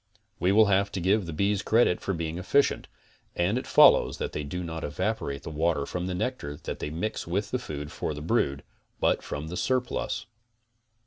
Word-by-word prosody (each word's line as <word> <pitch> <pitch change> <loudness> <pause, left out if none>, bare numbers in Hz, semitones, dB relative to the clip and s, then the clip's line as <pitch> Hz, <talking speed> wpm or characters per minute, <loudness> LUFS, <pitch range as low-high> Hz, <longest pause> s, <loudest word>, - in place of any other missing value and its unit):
We 90 +2 +2
will 110 +2 +6
have 100 0 +2
to 95 - -2
give 95 +2 +2
the - - -4
bees 100 +5 +1
credit 110 -5 +3
for - - -2
being 85 +1 -3
efficient, 140 +10 +2 0.5
and 90 +5 +1
it - - -9
follows - - +6
that - - -3
they 75 - -3
do 90 +6 -4
not 80 -1 -5
evaporate 70 0 -2
the - - -6
water 80 -2 0
from 90 +3 -4
the 90 - -2
nectar 90 - -3
that - - -5
they - - -3
mix 90 +8 -3
with 100 +5 -2
the 125 - 0
food 75 -10 -6
for 75 - -3
the 75 - -6
brood, 75 -8 0 0.4
but - - +2
from 75 +2 -5
the 90 - -5
surplus. 130 -1 -1
90 Hz, 200 wpm, -27 LUFS, 80-105 Hz, 0.5 s, will